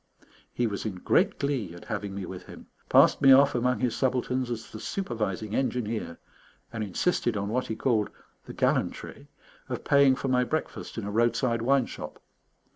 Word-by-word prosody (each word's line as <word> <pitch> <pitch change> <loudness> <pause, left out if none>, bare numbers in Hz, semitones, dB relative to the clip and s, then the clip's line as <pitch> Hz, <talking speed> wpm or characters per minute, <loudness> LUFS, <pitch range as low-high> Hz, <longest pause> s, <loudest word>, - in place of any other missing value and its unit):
He 120 - -1
was 100 -3 -3
in 105 -4 -3
great 90 - +2
glee 135 -11 -2
at 85 - -12
having 100 -1 -4
me 100 -2 -4
with 90 0 -9
him, - - -11 0.2
passed - - +5
me 135 -1 +7
off 140 +1 +7
among 125 +1 +1
his 125 -3 0
subalterns 130 -1 0
as 115 -2 -5
the 110 - -8
supervising 110 - -3
engineer, 115 -9 -2 0.6
and 115 -2 -3
insisted 110 - 0
on 100 0 -2
what 125 +3 -1
he 110 - -3
called 110 -4 +1 0.4
"the - - -9
gallantry" - - -1 0.4
of - - -4
paying 140 -2 +5
for 135 - -4
my 125 -1 +3
breakfast 155 -1 -4
in 110 - -3
a 100 - -4
roadside 115 +1 +1
wine 135 +1 +3
shop. - - -8
120 Hz, 180 wpm, -27 LUFS, 105-130 Hz, 0.6 s, me